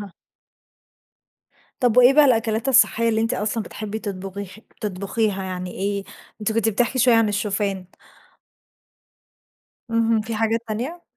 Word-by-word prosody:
آه. 200 -3 -9 1.7
طب 245 -2 +2
وإيه 250 +2 +7
بقى 300 +1 +6
الأكلات 225 -1 +1
الصحية 230 -3 +4
اللي 220 -1 +1
أنتِ 225 - 0
أصلًا 215 +1 -2
بتحبي 215 +1 -6
تطبغي 195 -2 -6 0.3
تطبخيها 200 0 -2
يعني 185 -1 -5
إيه؟ 200 0 -3 0.4
أنتِ 210 +1 -1
كنت 225 0 +1
بتحكي 240 +4 0
شوية 245 -1 +5
عن 225 -2 +4
الشوفان. 200 -2 -2 2.1
اهم، 230 -1 +2
في 220 +1 -5
حاجات 225 +1 0
تانية؟ 260 +11 -4
220 Hz, 130 wpm, -22 LUFS, 200-230 Hz, 2.1 s, وإيه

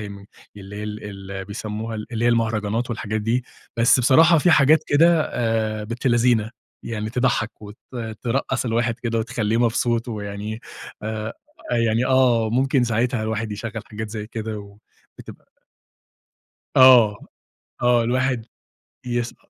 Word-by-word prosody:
يم 100 -1 -8 0.3
اللي 100 0 -10
هي 105 - -5
ال 105 0 -6
اللي 95 -1 -7
بيسمّوها 110 +2 -5 0.2
اللي 115 0 -1
هي - - +4
المهرجانات 115 0 0
والحاجات 110 -2 -3
دي، 120 +4 0 0.3
بس 115 +2 +4
بصراحة 160 +7 +6
في 175 +4 +3
حاجات 155 0 +5
كده 165 +2 +4
آآ 110 -2 -1
بنت 115 +4 -5
لذينة، 120 -3 +2 0.3
يعني 110 -2 -4
تضحّك 120 -3 -1
وت 105 0 -10 0.5
ترقّص 130 +1 -1
الواحد 115 0 0
كده 115 -1 -2
وتخلّيه 110 -1 -1
مبسوط 120 0 +1
ويعني 105 0 -5 0.4
آآ، 110 +1 -4 0.5
يعني 115 +3 +1
آه. 125 -4 +3
ممكن 130 +2 +2
ساعتها 120 0 0
الواحد 110 0 -3
يشغّل 110 +1 -5
حاجات 110 0 -5
زي 105 -1 -5
كده 105 -3 -7 0.4
وتب - - -10 1.4
آه. 125 -5 +6 0.6
آه. 120 -1 +4
الواحد 125 -1 0 0.6
يس 120 -1 -2
115 Hz, 130 wpm, -22 LUFS, 105-125 Hz, 1.4 s, بصراحة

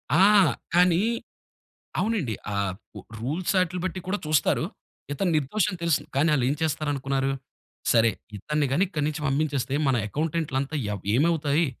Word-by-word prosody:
ఆ! - - +5 0.6
కానీ 180 -1 +5 1.0
అవునండి. 195 - 0 0.2
ఆహ్, 100 -2 0 0.5
రూల్స్ 155 - -1
ఆటిల 180 0 0
బట్టి 185 0 -3
కూడా 205 +2 0
చూస్తారు. 155 -2 +2 0.5
ఇతను 175 +5 0
నిర్దోషని 185 +7 0
తెలుసు. 170 -3 +2
కానీ 155 +4 +3
ఆళ్ళేం 135 0 +2
చేస్తారనుకున్నారు. 140 -3 0 0.6
"సరే 115 -1 +5 0.3
ఇతన్ని 150 +7 -1
గాని 160 +8 +3
ఇక్కడి 150 -6 -2
నుంచి 155 0 -3
పంపించేస్తే 140 -1 0
మన 130 - +3
అకౌంటెంట్లంత 150 0 -2 0.2
ఎవ్ 100 - -7
ఏమవుతాయి. 155 +1 +2
150 Hz, 125 wpm, -26 LUFS, 135-170 Hz, 1.0 s, ఆ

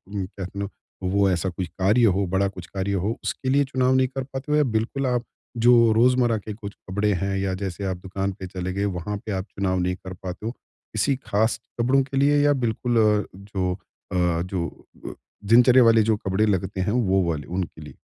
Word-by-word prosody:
कह 95 -1 -4
नो 100 0 -3 0.3
वो 100 +1 +2
ऐसा 90 0 0
कुछ 90 0 -4
कार्य 100 +8 +2
हो 100 +1 +1
बड़ा 100 +1 +3
कुछ 95 -3 -8
कार्य 95 0 -2
हो 105 - +1
उसके 130 - -3
लिए 140 +2 +4
चुनाव 130 -1 +1
नहीं 130 0 +3
कर 135 +1 -4
पाते 135 +2 -6
हो 150 - +4
या 150 - +4
बिल्कुल 120 +2 -1
आप 125 -1 0 0.4
जो 120 - +8 0.2
रोज़मर्रा 120 0 +3
के 105 +1 -6
कुछ 100 -1 -8 0.2
कपड़े 105 +2 +1
हैं 95 0 -1
या 95 -1 -1
जैसे 95 0 -5
आप 95 -1 -2
दुकान 95 +1 -3
पे 95 - -5
चले 90 0 -4
गए 100 +1 -1
वहाँ 105 +4 -4
पे 110 - -4
आप 95 -1 -2
चुनाव 95 -1 -1
नहीं 90 0 0
कर 95 0 -9
पाते 95 +2 -7
हो? 115 - -1
किसी 125 +1 -3
खास 110 +2 +1 0.2
कपड़ों 130 +3 +3
के 135 0 -5
लिए 145 +1 +4
या 145 - +5
बिल्कुल 120 -2 -1
अ, 105 -2 +3
जो 95 -2 -3 0.4
अ, 90 -2 +1
जो 90 -1 -2 0.4
अ, - - -5 0.4
दिनचर्या 125 +2 +7
वाले 115 -1 +5
जो 110 0 +2
कपड़े 100 +1 0
लगते 95 -2 -1
हैं 100 - 0
वो 100 -5 +2
वाले 75 -3 -3
उनके 90 -3 -4
लिए? 75 - -10
100 Hz, 215 wpm, -24 LUFS, 95-120 Hz, 0.4 s, जो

